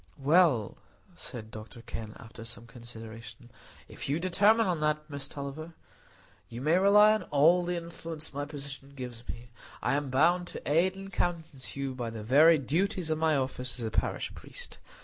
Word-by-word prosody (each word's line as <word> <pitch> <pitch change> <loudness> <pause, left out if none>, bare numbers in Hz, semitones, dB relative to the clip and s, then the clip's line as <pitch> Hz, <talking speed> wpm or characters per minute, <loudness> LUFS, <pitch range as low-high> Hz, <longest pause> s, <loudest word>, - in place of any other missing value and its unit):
"Well," 140 - +3 0.4
said 110 -3 -6
Dr 110 +2 -10
Kenn, 110 -2 -7
after 115 0 -11
some 115 +1 -5
consideration, 115 0 -11 0.4
"if - - -6
you 145 +3 +1
determine 205 +6 +4
on 180 -4 0
that, 150 0 0
Miss 140 -1 -3
Tulliver, 150 +4 -7 0.7
you 120 - -7
may 155 +7 +3
rely 210 +2 +7
on 215 - -1
all 160 +5 +5
the 175 0 -2
influence 165 -2 -6
my 145 +1 -3
position 140 -1 -8
gives 125 -3 -8
me. 120 0 -7 0.3
I - - 0
am 145 -1 0
bound 170 +7 +3
to - - -8
aid 175 +6 +3
and 195 0 -9
countenance 160 -8 -2
you 140 -1 -3
by 120 -2 -4
the 110 -1 -7
very 155 +8 +6
duties 170 - 0
of 155 - 0
my 160 -1 +3
office 130 -2 -2
as 115 - -3
a 110 - -3
parish - - -1
priest. - - -8
145 Hz, 175 wpm, -30 LUFS, 120-170 Hz, 0.7 s, rely